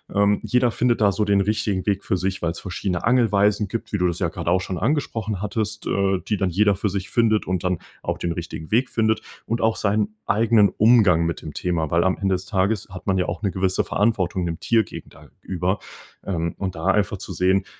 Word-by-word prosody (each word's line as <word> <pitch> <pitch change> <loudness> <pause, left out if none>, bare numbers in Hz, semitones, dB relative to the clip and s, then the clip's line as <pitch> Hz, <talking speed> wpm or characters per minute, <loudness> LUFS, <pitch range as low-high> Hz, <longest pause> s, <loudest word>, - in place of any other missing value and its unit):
ähm, 100 0 +3
jeder 125 -1 +2
findet 120 -1 +1
da 100 -1 +5
so 105 +2 0
den 100 -1 +3
richtigen 100 -2 -1
Weg 100 -2 -1
für - - +1
sich, 95 +1 -2
weil's 85 0 -2
verschiedene 90 -1 -3
Angelweisen 105 -3 +3
gibt, 110 +2 -5
wie 100 - 0
du 90 -1 +2
das 85 0 -2
ja 90 - 0
gerade 85 0 -4
auch 90 +1 +3
schon 90 -1 -4
angesprochen 110 - -1
hattest, 105 +1 -2
äh, 95 -1 +1
die 105 - 0
dann 95 -1 0
jeder 100 +3 +3
für 100 +2 -1
sich 95 0 -4
findet, 110 -4 +2
und 95 -1 -1
dann 90 -2 0 0.2
auch - - -2
den 85 - -2
richtigen 85 -1 -6
Weg 125 +4 +2
findet, 110 -1 +1 0.2
und 115 - -1
auch 110 0 +2
seinen 105 +1 0
eigenen 110 -1 +4
Umgang 105 -7 +4
mit 85 - -3
dem 75 - -8
Thema, 80 -4 -2
weil 85 +1 +3
am 95 - +1
Ende 95 -1 +1
des 90 - -6
Tages 100 0 0
hat 90 0 -10
man 95 - +2
ja 90 - +1
auch 85 -1 -4
'ne 100 - +1
gewisse 95 +1 0
Verantwortung 95 -4 0
dem 85 -1 -4
Tier 115 -2 +3
gegen - - -10
da - - -17
über, 95 +2 -1 0.5
ähm, 85 -3 -2
und 95 -3 -3
da 80 +2 -6
einfach 100 +1 +2
zu 95 0 -7
sehen: 95 +2 +2
100 Hz, 230 wpm, -23 LUFS, 90-110 Hz, 0.5 s, da